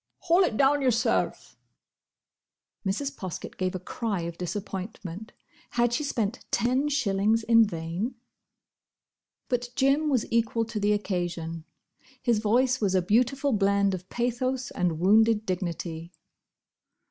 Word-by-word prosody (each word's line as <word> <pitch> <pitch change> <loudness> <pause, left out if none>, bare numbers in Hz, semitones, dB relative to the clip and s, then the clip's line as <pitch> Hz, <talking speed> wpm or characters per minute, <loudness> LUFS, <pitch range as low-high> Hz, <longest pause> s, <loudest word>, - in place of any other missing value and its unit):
"Haul 350 +2 +4
it 220 - 0
down 285 +1 +4
yourself." 250 -4 0 1.2
Mrs. 270 +9 -2
Poskett 185 -8 -6
gave 185 0 -1
a - - -2
cry 200 +1 -3
of 170 0 -5
disappointment. 190 +2 -5 0.5
Had 240 0 +3
she 300 - 0
spent 230 -5 -2
ten 255 +5 +1
shillings 220 -5 +1
in 230 0 +6
vain? 170 +7 -4 1.3
But 245 -1 -1
Jim 280 +3 +2
was 255 -6 +1
equal 230 0 +1
to 225 -1 -4
the 205 +1 +2
occasion. 175 -5 -3 0.5
His 235 -3 +1
voice 245 +4 +2
was 195 -3 +1
a 185 - +3
beautiful 250 +7 +2
blend 200 -1 +2
of 185 0 -6
pathos 250 +2 -1
and 175 -4 -1
wounded 215 +4 +4
dignity. 170 -3 -4
220 Hz, 125 wpm, -27 LUFS, 185-245 Hz, 1.3 s, in